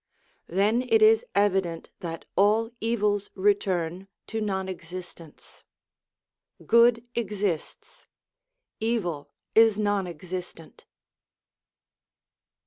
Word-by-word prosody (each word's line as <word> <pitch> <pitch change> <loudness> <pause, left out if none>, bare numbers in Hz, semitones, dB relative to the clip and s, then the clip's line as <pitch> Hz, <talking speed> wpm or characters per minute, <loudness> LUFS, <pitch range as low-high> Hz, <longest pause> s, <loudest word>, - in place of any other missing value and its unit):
Then 205 +7 +2
it 440 - +5
is 440 +1 +6
evident 190 -5 0
that 165 -2 -6
all 215 +4 +3
evils 210 -3 0
return 190 -3 0 0.2
to 220 0 -4
non 190 -2 -2
existence. 175 -3 -10 1.0
Good 235 0 +4
exists, 205 -7 -4 0.7
evil 175 -11 -2 0.2
is 225 -2 +5
non 205 -3 0
existent. 175 -1 -8
200 Hz, 80 wpm, -26 LUFS, 175-220 Hz, 1.0 s, is